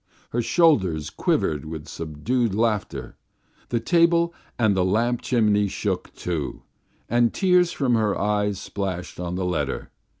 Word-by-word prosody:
Her 120 Hz, -, 0 dB
shoulders 95 Hz, -, +2 dB
quivered 75 Hz, -2 st, 0 dB
with 80 Hz, -1 st, -7 dB
subdued 95 Hz, +9 st, -2 dB
laughter, 110 Hz, -3 st, -1 dB, 0.5 s
the 120 Hz, -, +1 dB
table 170 Hz, +5 st, +3 dB, 0.2 s
and 110 Hz, -4 st, +3 dB
the 95 Hz, -, +2 dB
lamp 115 Hz, +6 st, +1 dB
chimney 105 Hz, -4 st, +2 dB
shook, -, -, -3 dB
too, 80 Hz, -6 st, -4 dB, 0.4 s
and 120 Hz, 0 st, +3 dB
tears 180 Hz, -2 st, +3 dB
from 135 Hz, -7 st, 0 dB
her 110 Hz, -3 st, +2 dB
eyes 105 Hz, -1 st, 0 dB
splashed 95 Hz, -4 st, -5 dB
on 90 Hz, 0 st, -3 dB
the 95 Hz, 0 st, -2 dB
letter. 90 Hz, -2 st, -2 dB
105 Hz, 135 wpm, -24 LUFS, 90-120 Hz, 0.5 s, table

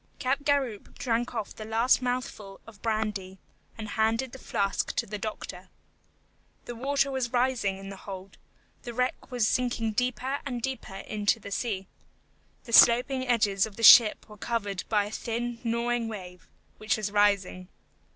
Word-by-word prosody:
Capgaroupe 270 Hz, -4 st, -1 dB
drank 240 Hz, 0 st, -1 dB
off 220 Hz, -3 st, -4 dB
the 215 Hz, -, -7 dB
last 225 Hz, +4 st, +2 dB
mouthful 245 Hz, -6 st, -4 dB
of 220 Hz, -3 st, -15 dB
brandy, 210 Hz, -4 st, -2 dB, 0.4 s
and 215 Hz, -1 st, -6 dB
handed 225 Hz, +4 st, 0 dB
the 265 Hz, -, -10 dB
flask 195 Hz, -5 st, -1 dB
to 235 Hz, -, 0 dB
the 210 Hz, -1 st, -6 dB
doctor. 215 Hz, +1 st, -6 dB, 1.0 s
The 240 Hz, -, -6 dB
water 275 Hz, +3 st, 0 dB
was 260 Hz, -3 st, -2 dB
rising 245 Hz, -6 st, +1 dB
in 195 Hz, 0 st, -9 dB
the 195 Hz, -, -8 dB
hold; 190 Hz, 0 st, -9 dB, 0.4 s
the 240 Hz, -1 st, -8 dB
wreck 250 Hz, +1 st, -1 dB
was 245 Hz, -4 st, +1 dB
sinking 240 Hz, -2 st, 0 dB
deeper 255 Hz, +4 st, -1 dB
and 250 Hz, -4 st, -4 dB
deeper 240 Hz, -5 st, -5 dB
into 205 Hz, +2 st, -1 dB
the 200 Hz, -, -10 dB
sea. 200 Hz, -3 st, -2 dB, 0.8 s
The 235 Hz, -, -9 dB
sloping 255 Hz, +3 st, +6 dB
edges 210 Hz, -5 st, +2 dB
of 210 Hz, -, -13 dB
the 230 Hz, -, -7 dB
ship 220 Hz, -1 st, +8 dB
were 210 Hz, -1 st, -13 dB
covered 205 Hz, -3 st, -3 dB
by 210 Hz, -2 st, +2 dB
a 205 Hz, -, -7 dB
thin 235 Hz, +1 st, -3 dB
gnawing 235 Hz, 0 st, 0 dB
wave, 180 Hz, -5 st, -9 dB, 0.3 s
which 215 Hz, +1 st, 0 dB
was 210 Hz, -2 st, -3 dB
rising. 200 Hz, -3 st, +1 dB
225 Hz, 160 wpm, -28 LUFS, 205-245 Hz, 1.0 s, ship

